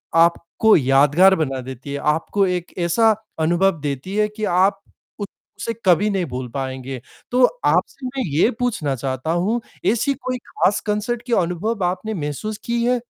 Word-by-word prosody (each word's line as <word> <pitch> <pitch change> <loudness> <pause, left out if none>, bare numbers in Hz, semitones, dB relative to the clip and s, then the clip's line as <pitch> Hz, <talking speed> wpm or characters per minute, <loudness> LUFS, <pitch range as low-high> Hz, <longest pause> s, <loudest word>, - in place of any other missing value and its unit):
आपको 170 +5 +4
यादगार 145 +8 +5
बना 135 -5 -2
देती 130 +2 -8
है, 140 - -3
आपको 160 +7 +1
एक 180 -1 -3
ऐसा 215 +6 +3 0.2
अनुभव 175 +2 +2
देती 145 +7 -4
है 210 0 +3
कि 215 +1 -8 0.2
आप 195 +1 +3 0.8
उसे 230 - -2
कभी 185 +4 +4
नहीं 195 -3 0
भूल 125 0 -4
पाएँगे। 130 -1 -5 0.3
तो 250 +1 +3 0.2
आपसे 275 -2 +1
मैं 260 0 -3
ये 160 +10 +3
पूछना 185 - -1
चाहता 130 +4 -3
हूँ 235 +3 +1 0.3
ऐसी 260 +5 +1
कोई 255 0 -4
खास 200 - +1
कॉन्सर्ट 215 +3 -1
के 240 - -1
अनुभव 185 +5 -2
आपने 190 +5 -2
महसूस 170 +6 -4
की 235 0 0
है? 250 0 +2
180 Hz, 160 wpm, -21 LUFS, 145-220 Hz, 0.8 s, यादगार